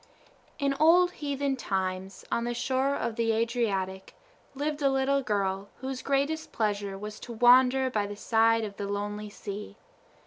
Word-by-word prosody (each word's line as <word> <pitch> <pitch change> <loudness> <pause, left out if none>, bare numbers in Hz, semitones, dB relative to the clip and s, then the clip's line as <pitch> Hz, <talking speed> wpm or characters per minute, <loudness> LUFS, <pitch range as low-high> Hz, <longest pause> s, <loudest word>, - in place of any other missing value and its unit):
In 280 -1 +1
old 350 +3 +6
heathen 280 -3 -2
times, 190 -3 -3
on 235 - +1
the 240 0 -2
shore 265 +3 0
of 235 -3 -3
the 225 -1 +2
Adriatic 210 -5 -1 0.4
lived 295 +2 -2
a 275 - +4
little 270 +1 +2
girl 200 -4 -1
whose 265 -1 -4
greatest 280 +3 -1
pleasure 205 -3 -1
was 210 +1 -7
to 240 - -8
wander 255 +3 +5
by 210 -3 0
the 205 - -6
side 225 +1 +3
of 205 -2 -6
the 200 - -3
lonely 205 +1 -3
sea. 205 0 -7
230 Hz, 160 wpm, -28 LUFS, 205-270 Hz, 0.4 s, old